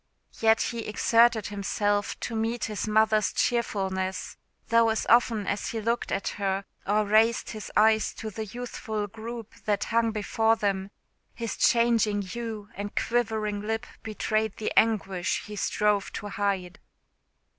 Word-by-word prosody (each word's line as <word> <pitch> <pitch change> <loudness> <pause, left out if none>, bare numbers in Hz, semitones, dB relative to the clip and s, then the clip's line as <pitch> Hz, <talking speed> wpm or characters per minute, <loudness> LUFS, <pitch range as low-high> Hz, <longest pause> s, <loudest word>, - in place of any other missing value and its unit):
Yet 225 0 +3
the 235 -2 -5
exerted 230 +1 +3
himself 205 0 -1
to 230 - -3
meet 225 +1 -1
his 215 0 -3
mother's 215 -1 +3
cheerfulness; 190 -5 -1 0.3
though 230 0 +5
as 220 - 0
often 230 -3 +4
as 205 - -2
he 225 - -3
looked 230 +2 -1
at 195 - -1
her, 195 -1 -2 0.2
or 210 +1 +2
raised 220 +3 +3
his 215 -2 -7
eyes 220 0 +4
to 220 -1 -6
the 220 +2 -5
youthful 220 -2 -4
group 225 +2 -8
that 205 -1 +1
hung 230 0 +3
before 220 +1 +1
them, 195 -3 -1 0.5
his 230 -1 -4
changing 230 -3 +3
hue 215 +1 -6
and 205 0 -6
quivering 220 -3 0
lip 225 +2 -2 0.2
betrayed 215 -1 -1
the 215 - -2
anguish 195 -6 +1
he 210 - -8
strove 210 0 +1
to 205 - -5
hide. 195 -2 -2
215 Hz, 145 wpm, -27 LUFS, 205-225 Hz, 0.5 s, though